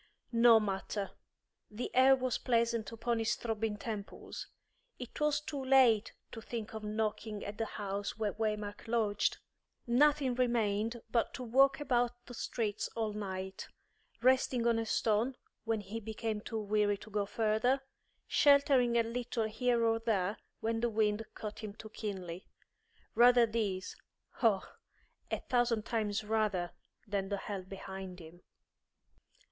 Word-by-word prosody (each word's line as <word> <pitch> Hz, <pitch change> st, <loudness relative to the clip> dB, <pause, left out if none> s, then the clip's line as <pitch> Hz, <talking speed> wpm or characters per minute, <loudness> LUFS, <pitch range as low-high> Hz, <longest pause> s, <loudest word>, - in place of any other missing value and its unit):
No 230 Hz, -1 st, +7 dB
matter; 200 Hz, 0 st, -3 dB, 0.6 s
the 220 Hz, +3 st, -5 dB
air 260 Hz, +1 st, +7 dB
was 255 Hz, -2 st, -1 dB
pleasant 230 Hz, -3 st, +1 dB
upon 230 Hz, 0 st, -1 dB
his 225 Hz, -, +1 dB
throbbing 225 Hz, -2 st, -2 dB
temples. 210 Hz, -2 st, -6 dB, 0.5 s
It 250 Hz, -2 st, -8 dB
was 300 Hz, -1 st, +3 dB
too 295 Hz, -2 st, -5 dB
late 250 Hz, -5 st, +5 dB, 0.2 s
to 225 Hz, -, -7 dB
think 225 Hz, -1 st, -5 dB
of 220 Hz, -1 st, -6 dB
knocking 215 Hz, 0 st, -2 dB
at 205 Hz, +1 st, -6 dB
the 225 Hz, -, +1 dB
house 200 Hz, 0 st, -3 dB
where 215 Hz, -2 st, -1 dB
Waymark 210 Hz, -1 st, -3 dB
lodged. 215 Hz, -3 st, +1 dB, 0.5 s
Nothing 275 Hz, +2 st, +3 dB
remained 230 Hz, -2 st, 0 dB
but 230 Hz, 0 st, +1 dB
to 255 Hz, -, -5 dB
walk 270 Hz, +4 st, +4 dB
about 245 Hz, -4 st, +1 dB
the 245 Hz, -, -10 dB
streets 220 Hz, -3 st, -2 dB
all 220 Hz, -2 st, -1 dB
night, 190 Hz, -2 st, -5 dB, 0.6 s
resting 255 Hz, -1 st, +3 dB
on 230 Hz, -1 st, +3 dB
a 225 Hz, -, -2 dB
stone 225 Hz, +5 st, +1 dB, 0.3 s
when 225 Hz, -2 st, 0 dB
he 205 Hz, +3 st, -6 dB
became 220 Hz, 0 st, -3 dB
too 225 Hz, +1 st, -4 dB
weary 210 Hz, -1 st, +1 dB
to 215 Hz, -, -13 dB
go 205 Hz, -1 st, 0 dB
further, 225 Hz, +5 st, +1 dB, 0.4 s
sheltering 275 Hz, -4 st, +4 dB
a 230 Hz, -, +4 dB
little 235 Hz, 0 st, -2 dB
here 235 Hz, +2 st, +1 dB
or 225 Hz, 0 st, +2 dB
there 210 Hz, -3 st, 0 dB, 0.2 s
when 225 Hz, 0 st, 0 dB
the 240 Hz, +1 st, +1 dB
wind 215 Hz, 0 st, +1 dB
cut 210 Hz, -1 st, -6 dB
him 210 Hz, -2 st, -7 dB
too 220 Hz, -, -10 dB
keenly. 190 Hz, -5 st, -6 dB, 0.7 s
Rather 245 Hz, 0 st, +7 dB
this, 210 Hz, -5 st, -2 dB, 0.5 s
oh, 215 Hz, -6 st, +3 dB, 0.6 s
a -, -, -2 dB
thousand 240 Hz, -3 st, +1 dB
times 215 Hz, -3 st, -1 dB
rather, 210 Hz, -5 st, 0 dB, 0.3 s
than 200 Hz, -2 st, -2 dB
the 200 Hz, -, -1 dB
hell 200 Hz, 0 st, -4 dB
behind 190 Hz, 0 st, -8 dB
him. 170 Hz, +1 st, -13 dB
225 Hz, 145 wpm, -33 LUFS, 205-240 Hz, 0.7 s, No